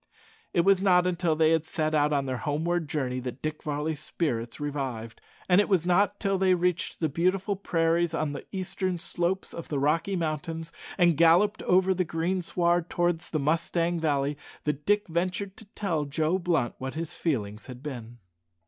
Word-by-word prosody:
It 170 Hz, -, +3 dB
was 195 Hz, +1 st, +4 dB
not 180 Hz, -2 st, +4 dB
till 170 Hz, -3 st, +2 dB
they 160 Hz, 0 st, +4 dB
had 160 Hz, -1 st, +3 dB
set 155 Hz, -1 st, -2 dB
out 150 Hz, -1 st, +3 dB
on 140 Hz, -2 st, +1 dB
their 130 Hz, -1 st, -2 dB
homeward 155 Hz, +5 st, -1 dB
journey 130 Hz, -4 st, -1 dB
that 125 Hz, 0 st, -6 dB
Dick 155 Hz, 0 st, -3 dB
Varley's 150 Hz, 0 st, -2 dB
spirits 125 Hz, -7 st, -3 dB
revived, 135 Hz, -6 st, -4 dB, 0.3 s
and 180 Hz, +2 st, +6 dB
it -, -, -2 dB
was 180 Hz, -4 st, +2 dB
not 200 Hz, +3 st, +2 dB
till 195 Hz, -2 st, 0 dB
they 190 Hz, -1 st, +4 dB
reached 180 Hz, 0 st, -1 dB
the 160 Hz, -, +3 dB
beautiful 185 Hz, +6 st, 0 dB
prairies 170 Hz, -3 st, +1 dB
on 155 Hz, -3 st, -1 dB
the -, -, -6 dB
eastern 185 Hz, -1 st, -2 dB
slopes 180 Hz, +1 st, -2 dB
of 170 Hz, -, -7 dB
the 145 Hz, -, -1 dB
Rocky 160 Hz, +7 st, +1 dB
Mountains, 165 Hz, 0 st, -3 dB, 0.3 s
and 175 Hz, -3 st, +4 dB
galloped 175 Hz, +6 st, +4 dB
over 185 Hz, +1 st, +3 dB
the 185 Hz, 0 st, +1 dB
greensward 175 Hz, 0 st, 0 dB
towards 175 Hz, -1 st, 0 dB
the 155 Hz, -, -1 dB
Mustang 165 Hz, +3 st, 0 dB
Valley, 145 Hz, -2 st, 0 dB, 0.2 s
that 150 Hz, -1 st, -3 dB
Dick 205 Hz, 0 st, +3 dB
ventured 185 Hz, +3 st, -2 dB
to 220 Hz, -, -12 dB
tell 165 Hz, -8 st, -1 dB
Joe 155 Hz, +5 st, 0 dB
Blunt 170 Hz, -9 st, 0 dB
what 130 Hz, +2 st, -5 dB
his 165 Hz, 0 st, -4 dB
feelings 110 Hz, -9 st, -2 dB
had 125 Hz, 0 st, -10 dB
been. 120 Hz, -5 st, -7 dB
165 Hz, 180 wpm, -27 LUFS, 150-180 Hz, 0.3 s, and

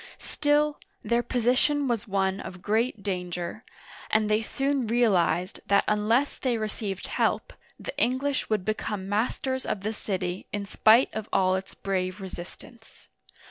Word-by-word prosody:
Still, 295 Hz, 0 st, +1 dB, 0.2 s
their 235 Hz, 0 st, +2 dB
position 255 Hz, +4 st, +2 dB
was 235 Hz, -4 st, -1 dB
one 195 Hz, -1 st, 0 dB
of 180 Hz, -1 st, -8 dB
great 220 Hz, 0 st, 0 dB
danger, 180 Hz, +1 st, -3 dB, 0.5 s
and 215 Hz, 0 st, +2 dB
they 215 Hz, +1 st, +3 dB
soon 270 Hz, +2 st, -1 dB
realized 190 Hz, -6 st, +2 dB
that 200 Hz, 0 st, +4 dB
unless 225 Hz, +6 st, +2 dB
they 250 Hz, -3 st, +1 dB
received 210 Hz, -3 st, -3 dB
help, -, -, 0 dB, 0.3 s
the -, -, -6 dB
English 265 Hz, +3 st, +1 dB
would 210 Hz, -4 st, 0 dB
become 210 Hz, -2 st, -2 dB
masters 250 Hz, +5 st, 0 dB
of 195 Hz, -, -2 dB
the 215 Hz, +2 st, -2 dB
city 185 Hz, -3 st, -3 dB
in 205 Hz, -1 st, -3 dB
spite 220 Hz, +5 st, +5 dB
of 220 Hz, -1 st, -5 dB
all 185 Hz, -1 st, +3 dB
its 190 Hz, +1 st, -3 dB
brave 185 Hz, 0 st, -2 dB
resist 185 Hz, -2 st, -7 dB
ance. 230 Hz, -2 st, -17 dB
215 Hz, 145 wpm, -27 LUFS, 190-245 Hz, 0.5 s, spite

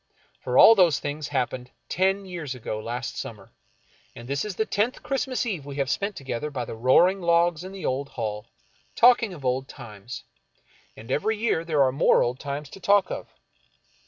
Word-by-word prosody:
For 125 Hz, 0 st, -1 dB
all 225 Hz, -, +10 dB
those 175 Hz, -9 st, +4 dB
things 145 Hz, 0 st, -4 dB
happened 125 Hz, -2 st, -2 dB, 0.2 s
ten 190 Hz, +2 st, +1 dB
years 170 Hz, -8 st, -6 dB
ago 110 Hz, -3 st, -5 dB
last 120 Hz, +3 st, -5 dB
summer, 100 Hz, -4 st, -8 dB, 0.6 s
and 120 Hz, -, -10 dB
this 140 Hz, +1 st, -1 dB
is 210 Hz, -3 st, -5 dB
the 220 Hz, -, 0 dB
tenth 220 Hz, +5 st, -1 dB
Christmas 265 Hz, -2 st, -1 dB
Eve 190 Hz, -11 st, -3 dB
we 140 Hz, 0 st, -8 dB
have 140 Hz, -1 st, -1 dB
spent 200 Hz, 0 st, -2 dB
together 135 Hz, +1 st, -4 dB
by 130 Hz, -5 st, -4 dB
the -, -, -7 dB
roaring 170 Hz, +12 st, +4 dB
logs 170 Hz, -1 st, +2 dB
in 185 Hz, -, -8 dB
the 195 Hz, -1 st, -7 dB
old 135 Hz, +2 st, -2 dB
hall, 105 Hz, -2 st, -5 dB, 0.5 s
talking 235 Hz, -3 st, +5 dB
of 150 Hz, -7 st, -10 dB
old 130 Hz, +1 st, 0 dB
times; 120 Hz, -2 st, -10 dB, 0.7 s
and 110 Hz, -, -9 dB
every 215 Hz, +7 st, 0 dB
year 210 Hz, -7 st, 0 dB
there 155 Hz, -4 st, +2 dB
are 130 Hz, -, +2 dB
more 135 Hz, -, +4 dB
old 125 Hz, +2 st, -2 dB
times 145 Hz, 0 st, -5 dB
to -, -, -11 dB
talk 200 Hz, 0 st, +3 dB
of. -, -, -5 dB
145 Hz, 190 wpm, -25 LUFS, 125-190 Hz, 0.7 s, all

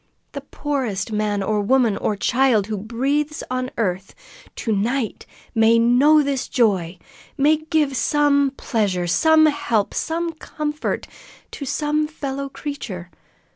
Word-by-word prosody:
The 280 Hz, -, -6 dB
poorest 265 Hz, -8 st, -3 dB
man 210 Hz, -2 st, -1 dB
or 210 Hz, +1 st, 0 dB
woman 235 Hz, 0 st, +2 dB
or 210 Hz, -, -1 dB
child 235 Hz, 0 st, +2 dB
who 215 Hz, 0 st, -4 dB
breathes 275 Hz, +8 st, -1 dB
on 255 Hz, 0 st, -2 dB
earth 190 Hz, -3 st, -2 dB, 0.4 s
to 225 Hz, -, -3 dB
night 230 Hz, +3 st, -2 dB, 0.3 s
may 225 Hz, 0 st, +4 dB
know 265 Hz, +7 st, +5 dB
this 275 Hz, -2 st, -2 dB
joy, 190 Hz, -8 st, +1 dB, 0.4 s
may 300 Hz, +3 st, +4 dB
give 310 Hz, -3 st, 0 dB
some 285 Hz, +2 st, +2 dB
pleasure, 195 Hz, -6 st, -1 dB
some 315 Hz, -, +4 dB
help, 235 Hz, -8 st, 0 dB
some 335 Hz, +1 st, -2 dB
comfort, 305 Hz, -1 st, -4 dB, 0.5 s
to 280 Hz, -, -6 dB
some 300 Hz, +2 st, 0 dB
fellow 275 Hz, -2 st, -5 dB
creature. 210 Hz, -, -7 dB
260 Hz, 130 wpm, -21 LUFS, 215-295 Hz, 0.5 s, know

